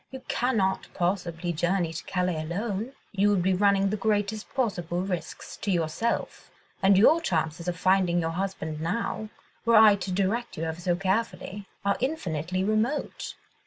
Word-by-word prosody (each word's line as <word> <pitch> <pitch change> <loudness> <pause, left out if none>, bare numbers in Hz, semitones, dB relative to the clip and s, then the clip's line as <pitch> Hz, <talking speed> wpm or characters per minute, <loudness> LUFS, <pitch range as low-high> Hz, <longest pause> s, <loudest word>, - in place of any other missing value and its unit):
—you 265 -1 -9
cannot 215 -7 0
possibly 175 -1 -1
journey 175 0 0
to 165 - -5
Calais 180 -4 -1
alone. 205 +8 -3 0.2
You 205 0 +3
would 195 -4 +2
be 190 +1 +3
running 200 0 +3
the - - +1
greatest 210 +1 -1
possible 180 -8 -1
risks 185 -3 -5
to 205 - -4
yourself, 175 +6 -1 0.3
and 195 0 +5
your 310 - +6
chances 160 - -1
of 175 0 -1
finding 185 -1 +3
your 165 -1 -1
husband 165 -4 -3
now—were 220 +4 -2
I 215 -1 +9
to 190 0 -4
direct 200 +6 -1
you 160 - -3
ever 160 +1 -3
so 175 0 +1
carefully—are 200 0 -2
infinitely 185 - -1
remote." 215 +8 -1
190 Hz, 150 wpm, -27 LUFS, 175-210 Hz, 0.3 s, I